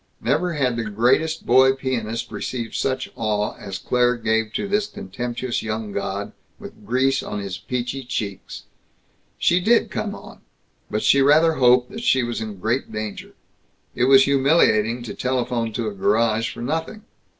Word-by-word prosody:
Never 160 +8 0
has 130 -5 0
the 115 -1 -3
greatest 125 +10 +1
boy 130 +2 +5
pianist 120 -4 -3
received 120 -3 -4
such 130 -1 -2
awe 105 -2 -1
as 95 -2 -6
Claire 125 0 +1
gave 110 -1 0
to - - -2
this 205 +1 0
contemptuous 125 - -4
young 110 -1 -4
god, 100 0 -4 0.3
with 105 - -12
grease 130 +3 +2
on 105 - -5
his 100 -2 -5
peachy 125 +2 -4
cheeks. 105 -6 -5 0.7
She 175 - +3
did 230 +6 +2
come 205 -1 -3
on. - - -13 0.5
But 105 - -2
she 140 - +5
rather 155 +4 +5
hoped 125 -3 +4
that 220 - -7
she 130 - +3
was 120 -1 -3
in 110 -2 -6
great 115 +8 -2
danger. 110 -1 -6 0.6
It 120 - +1
was 135 0 +7
humiliating 130 -5 +3
to 120 - -6
telephone 125 -3 -1
to 115 +1 -2
a 105 - -3
garage 110 +3 +1
for 120 - -8
nothing. 160 - -3
125 Hz, 160 wpm, -22 LUFS, 110-135 Hz, 0.7 s, was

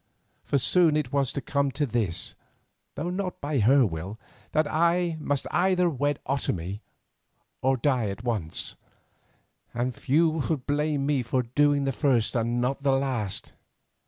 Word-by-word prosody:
For 140 - +1
soon 155 +5 +4
it 140 -4 -2
was 140 -3 +2
to 140 - -3
come 140 0 0
to 145 - +1
this, 110 - -2 0.6
though 170 +4 -3
not 185 0 -3
by 145 -1 -1
her 130 +5 +5
will, 95 +4 -5 0.3
that 155 0 +2
I 170 +2 +1
must 145 -2 -1
either 180 -1 +2
wed 145 0 0
Otomie 100 -7 -2 0.8
or 135 0 +2
die 125 -3 +1
at 100 +3 -6
once, 105 -10 -3 1.0
and 125 +2 -1
few 155 +7 +2 0.2
would 150 -6 -1
blame 145 -1 0
me 145 -2 +1
for 125 +2 0
doing 145 +4 +2
the 135 - +1
first 130 -4 +1
and 120 +1 0
not 130 +3 -1
the 140 -1 +2
last. 130 -7 -2
135 Hz, 155 wpm, -27 LUFS, 120-150 Hz, 1.0 s, her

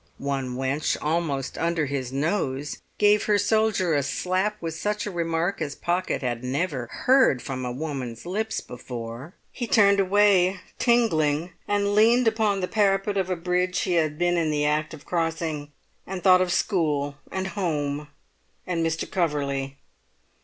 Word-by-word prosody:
One 135 -3 -3
wench, 135 +3 0
almost 150 -4 -2
under 165 -2 +1
his 135 -3 -3
nose, 140 -1 -1 0.2
gave 210 0 +4
her 210 -1 +3
soldier 205 -4 +2
a 145 - +2
slap 185 +8 -1
with 165 -1 -4
such 205 +5 -2
a 205 - -4
remark 170 +2 -1
as 145 -1 -3
Pocket 175 -4 -1
had 120 -1 -2
never 130 -1 -2
heard 260 - +3
from 130 0 -5
a 125 - -3
woman's 130 -3 -5
lips 215 +5 -2
before. 120 - -8 0.2
He 240 - -4
turned 200 -3 +5
away, 195 -1 +4 0.2
tingling, 170 - +2 0.2
and 205 0 +1
leant 230 +3 +5
upon 215 -3 +1
the 180 - -1
parapet 200 -1 +1
of 190 -2 0
a 185 - 0
bridge 180 +1 0
he 185 - -1
had 155 -3 +1
been 175 +1 +2
in 165 -2 +1
the 150 -1 0
act 155 +1 0
of 150 - -16
crossing, 165 -3 -2 0.4
and 190 -1 -5
thought 185 -1 +6
of 185 -1 +1
school 150 -8 0
and 190 0 -2
home 150 -7 -2 0.6
and 170 -2 -1
Mr. 165 0 -1
Coverley. 140 -5 -1
170 Hz, 160 wpm, -25 LUFS, 145-195 Hz, 0.6 s, thought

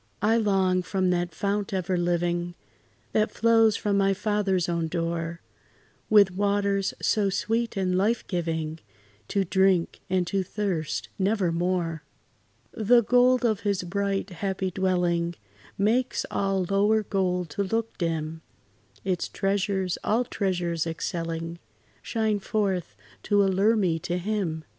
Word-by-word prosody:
I 220 +2 +4
long, 190 -4 +2
from 185 0 0
that 175 0 0
fount 200 +1 -1
ever 185 0 -1
living, 175 0 0 0.6
That 215 0 +2
flows 225 -2 +3
by 210 - -1
my 195 -1 +3
Father's 195 -4 0
own 170 -1 -1
door, 165 0 -3 0.7
With 205 -3 +6
waters 200 0 0
so 205 -2 +2
sweet 225 +3 -1
and 185 -1 +1
life 215 +5 +1
giving, 160 -3 -3 0.5
To 200 - +1
drink, 190 -1 +2
and 185 -1 +1
to 195 +3 0
thirst 185 -5 -3
never 195 -2 +1
more. 170 -2 -1 0.7
The 235 +2 +4
gold 250 +2 +4
of 215 -4 +2
his 200 -3 -1
bright, 200 +2 -2
happy 190 +1 -2
dwelling 175 -2 0 0.4
Makes 235 +6 +1
all 195 -2 0
lower 205 +3 +3
gold 180 -4 -1
to 200 - -1
look 225 +3 -2
dim; 160 -2 -2 0.6
Its 185 -3 -1
treasures, 195 -2 -1
all 230 +4 +2
treasures 175 -7 -1
excelling, 165 0 -4 0.4
Shine 220 -2 0
forth 190 - -1 0.3
to 205 -1 +3
allure 195 +4 +3
me 180 -6 +1
to 175 +2 -2
Him. 180 -5 -2
190 Hz, 130 wpm, -26 LUFS, 175-205 Hz, 0.7 s, With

